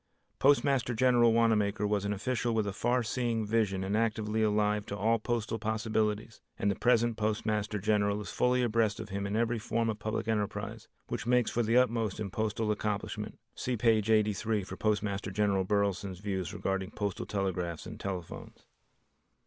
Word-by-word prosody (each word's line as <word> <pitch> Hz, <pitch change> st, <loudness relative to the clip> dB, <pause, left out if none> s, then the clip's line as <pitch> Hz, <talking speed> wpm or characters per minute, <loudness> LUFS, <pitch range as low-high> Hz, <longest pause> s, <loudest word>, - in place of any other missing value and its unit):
Postmaster 135 Hz, -3 st, +3 dB
General 120 Hz, -1 st, +4 dB
Wanamaker 110 Hz, -2 st, +2 dB
was 105 Hz, -1 st, 0 dB
an 100 Hz, -, -1 dB
official 120 Hz, +3 st, -1 dB
with 110 Hz, -2 st, +1 dB
a 100 Hz, -, -3 dB
far 120 Hz, +4 st, +1 dB
seeing 115 Hz, -1 st, -1 dB
vision 105 Hz, -3 st, +1 dB
and 100 Hz, +2 st, -1 dB
actively 110 Hz, -1 st, 0 dB
alive 105 Hz, -1 st, +2 dB
to 100 Hz, -, -4 dB
all 115 Hz, +3 st, +2 dB
postal 115 Hz, 0 st, -2 dB
possibilities, 110 Hz, 0 st, -1 dB, 0.2 s
and 100 Hz, -, +1 dB
the -, -, -2 dB
present 120 Hz, 0 st, +2 dB
Postmaster 105 Hz, -1 st, -1 dB
General 100 Hz, 0 st, +1 dB
is 100 Hz, -5 st, -6 dB
fully 125 Hz, 0 st, +2 dB
abreast 115 Hz, -2 st, +1 dB
of -, -, -6 dB
him 100 Hz, 0 st, -3 dB
in 100 Hz, -, -2 dB
every 115 Hz, +1 st, +1 dB
form 115 Hz, +1 st, 0 dB
of 105 Hz, -, -7 dB
public 110 Hz, +1 st, -3 dB
enterprise 105 Hz, -2 st, -2 dB, 0.2 s
which -, -, -4 dB
makes 125 Hz, -1 st, +3 dB
for 120 Hz, -, +1 dB
the 115 Hz, +1 st, +2 dB
utmost 115 Hz, -5 st, +1 dB
in 100 Hz, -3 st, -4 dB
postal 110 Hz, +1 st, -1 dB
accomplishment 105 Hz, -1 st, -3 dB, 0.2 s
(See 125 Hz, -1 st, -2 dB
page 110 Hz, -1 st, +2 dB
83, 105 Hz, -1 st, +2 dB
for -, -, -7 dB
Postmaster 105 Hz, -2 st, -1 dB
General 100 Hz, -1 st, +1 dB
Burleson's 100 Hz, -1 st, 0 dB
views 95 Hz, -1 st, -3 dB
regarding 95 Hz, -2 st, -2 dB
Postal 100 Hz, -3 st, -3 dB
Telegraphs 90 Hz, -5 st, -2 dB
and -, -, -8 dB
Telephones). 90 Hz, -4 st, -6 dB
105 Hz, 170 wpm, -30 LUFS, 100-115 Hz, 0.2 s, General